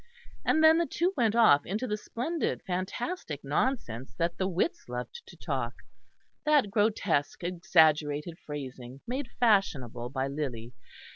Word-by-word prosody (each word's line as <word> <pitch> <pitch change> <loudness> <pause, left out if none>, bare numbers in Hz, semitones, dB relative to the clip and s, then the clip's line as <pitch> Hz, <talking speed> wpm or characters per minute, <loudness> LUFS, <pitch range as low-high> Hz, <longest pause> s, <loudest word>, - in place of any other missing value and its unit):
And 315 - +3
then 320 +1 +7
the 340 - +1
two 360 +3 0
went 225 -3 +2
off 180 -12 +6
into 210 +7 -3
the 210 - -1
splendid 255 +10 -3
fantastic 185 - -3
nonsense 140 - -2
that 170 0 0
the 190 - +1
wits 195 - -1
loved 125 -1 -5
to 175 - -13
talk; 130 -7 -3 0.7
that 295 -9 +3
grotesque, 205 -8 +1
exaggerated 160 -3 +2
phrasing 130 -3 -7
made 260 +2 -3
fashionable 140 - +2
by 130 0 -2
Lyly. 130 -5 -4
175 Hz, 135 wpm, -29 LUFS, 140-230 Hz, 0.7 s, then